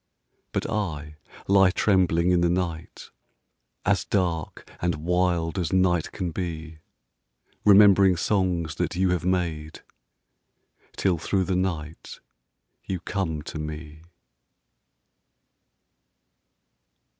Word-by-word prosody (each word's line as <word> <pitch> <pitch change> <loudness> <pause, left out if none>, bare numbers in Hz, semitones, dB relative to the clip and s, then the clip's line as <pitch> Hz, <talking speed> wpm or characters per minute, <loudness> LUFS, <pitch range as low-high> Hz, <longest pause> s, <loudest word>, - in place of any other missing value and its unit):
But - - -2
I 75 -8 -4 0.3
lie 95 -1 +5
trembling 90 -3 +2
in 90 -1 +3
the 85 - +2
night, 85 -2 -4 0.7
As - - +2
dark 85 -5 -2
and 85 -1 0
wild 85 +2 0
as 85 -4 -2
night 90 -3 +2
can 90 -3 -4
be, 80 -2 -6 0.9
Remembering 100 -2 +6
songs 90 -4 0
that - - -2
you 95 0 +1
have 90 -2 -1
made 85 -4 -2 1.1
Till 90 -4 +1
through 95 +3 0
the 95 0 -1
night 85 -4 -4 0.6
you 95 -2 -4
come 80 -5 -3
to 80 - -7
me. 75 0 -7
90 Hz, 100 wpm, -25 LUFS, 80-95 Hz, 1.1 s, Remembering